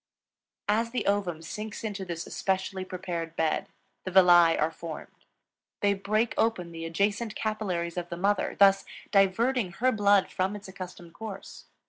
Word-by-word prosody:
As 225 +3 +2
the 250 - -2
ovum 190 -5 0
sinks 215 +6 -6
into 205 -3 -3
this 170 -3 -5
especially 190 0 -2
prepared 175 -3 -5
bed, 160 -1 0 0.4
the - - -4
villi 175 -3 +6
are 155 +2 +1
formed. 165 -1 -9 0.6
They 205 0 +3
break 215 +4 0
open 185 -7 +1
the 165 0 -6
adjacent 200 +6 -1
capillaries 185 -6 -2
of 175 -1 -3
the 170 - -5
mother, 200 +2 +1
thus 195 -1 +6 0.3
diverting 200 +1 +2
her 255 +6 +2
blood 205 -3 +3
from 190 +2 -1
its 205 -1 -9
accustomed 180 -3 -9
course. 205 0 -8
190 Hz, 150 wpm, -28 LUFS, 175-210 Hz, 0.6 s, villi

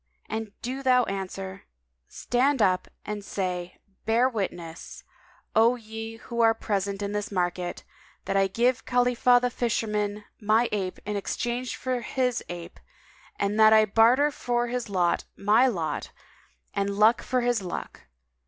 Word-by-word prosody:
and 220 -1 -4
do 260 +3 -3
thou 255 -2 +4
answer, 195 -1 -5 0.4
'Stand 265 +3 +1
up 185 -3 +2 0.2
and 210 -1 -4
say, 180 -3 -3 0.3
'Bear 230 +3 +3
witness, 175 -8 -5 0.5
O 230 +3 +5
ye 225 -1 -7
who 235 +1 -3
are 225 -1 +5
present 200 -2 -2
in 200 - -2
the 210 0 -2
market, 180 -1 -2 0.4
that 195 - -2
I 195 0 +4
give 240 +6 +1
Khalifah 245 0 +4
the 245 0 -1
fisherman 210 -3 -1 0.2
my 220 +3 +3
ape 190 -3 -2
in 210 0 -3
exchange 240 +5 -3
for 255 -1 -2
his 250 0 -1
ape, 175 -1 -8 0.6
and 200 +2 -1
that 220 0 +8
I 215 0 +6
barter 235 +8 +4
for 240 -3 -1
his 245 -2 -3
lot 180 -3 +1
my 215 +6 +4
lot 170 -10 -2 0.6
and 200 0 -1
luck 220 +3 +5
for 255 0 0
his 240 -3 +1
luck.' 180 -2 -6
220 Hz, 145 wpm, -26 LUFS, 195-245 Hz, 0.6 s, that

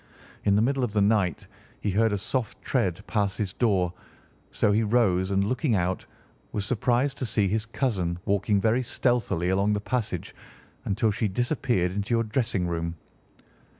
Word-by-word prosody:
In 100 - +4
the 105 - +4
middle 135 +1 +1
of 115 -4 -1
the 105 - +2
night 100 -6 +1 0.3
he 105 - -1
heard 110 +3 +3
a 100 - 0
soft 115 +4 -3
tread 100 -7 0
pass 100 -3 0
his 100 -3 -2
door, 95 -8 +1 0.6
so 105 - +2
he 105 +2 +3
rose 100 -5 +2
and, 100 0 +2
looking 125 +3 +1
out, 90 0 -1 0.5
was 100 -2 -2
surprised 125 +4 +1
to 130 - -1
see 105 -2 +2
his 110 +3 -1
cousin 100 -9 -1
walking 100 +1 +2
very 115 +5 +2
stealthily 120 -8 0
along 100 +2 +2
the 105 - 0
passage 110 -5 -3 0.5
until 105 +2 +1
she 105 +1 0
disappeared 120 - 0
into 100 +4 -1
your 115 - +2
dressing 110 -4 -1
room. 85 0 -2
105 Hz, 170 wpm, -26 LUFS, 95-120 Hz, 0.6 s, In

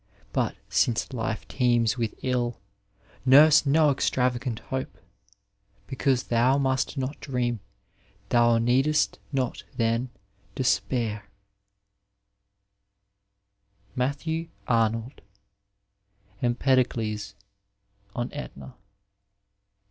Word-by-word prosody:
But, 125 -5 0
since 110 +5 +1
life 110 -2 -3
teems 120 -4 +2
with 115 -3 -2
ill. 120 -4 -1 0.6
Nurse 145 +3 +7
no 150 +1 +4
extravagant 125 -3 0
hope; 130 +2 -5 0.9
Beoanse 130 -1 0
thou 120 +3 +3
must 135 +1 0
not 135 +2 -3
dream, 125 -4 -2 0.7
thou 120 -1 +4
need'st 130 +6 +2
not 130 -4 -2
then 115 +1 0 0.5
despairii 120 -4 0 2.7
Matthbw 160 +6 -2 0.2
Abvold, 115 +2 0 1.2
Smpeiode$ 120 -5 0 0.8
on 120 0 -3
Etna. 145 -2 -8
125 Hz, 75 wpm, -26 LUFS, 115-135 Hz, 2.7 s, Nurse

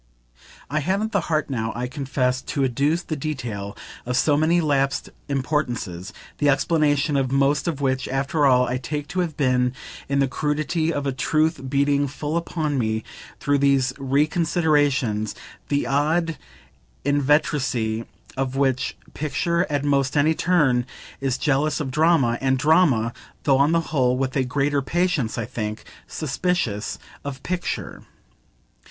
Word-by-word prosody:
I 150 +3 -1
haven't 195 +8 0
the 200 - +2
heart 155 -1 +1
now, 115 -5 -2
I 120 +1 -2
confess, 130 -1 -1
to 140 - -2
adduce 140 +7 +1
the 155 - -3
detail 120 -9 -4 0.3
of 125 +1 -1
so 145 +1 +3
many 160 +4 +3
lapsed 140 -4 0 0.2
importances; 125 - -2 0.3
the 145 - +3
explanation 145 0 +2
of 135 -2 +1
most 140 +3 +2
of 150 -4 -2
which, 130 -1 0
after 140 +2 +1
all, 125 -1 +5
I 125 - -1
take 145 +4 -4
to 185 - -2
have 170 -4 -1
been 125 -3 +2 0.4
in 140 - +1
the 135 -1 +3
crudity 155 +4 -1
of 145 -3 -2
a 135 - +1
truth 155 +1 0
beating 140 +1 +2
full 145 +3 -4
upon 155 -4 -1
me 110 -1 -1 0.4
through 145 0 +1
these 135 -2 +3
reconsiderations, 145 - +1 0.3
the 145 -2 0
odd 155 +5 +1 0.7
inveteracy 140 -6 +1 0.3
with 135 0 -1
which 135 -1 0 0.2
picture, 170 +4 0
at 145 -2 0
almost 140 -1 +1
any 155 +3 +4
turn, 145 -9 +2 0.3
is 135 -2 -1
jealous 150 +1 +1
of 140 -4 -3
drama, 150 -6 +3
and 130 0 +2
drama 135 -6 +3 0.3
(though 135 -2 +3
on 145 +3 +4
the 165 0 +3
whole 125 -3 +2
with 130 0 -2
a 135 - +2
greater 140 +2 +1
patience, 165 -5 0
I 115 - -2
think) 105 -1 -4 0.2
suspicious 145 - -2 0.3
of 140 -2 -6
picture. 180 -1 -3
140 Hz, 145 wpm, -23 LUFS, 130-155 Hz, 0.7 s, all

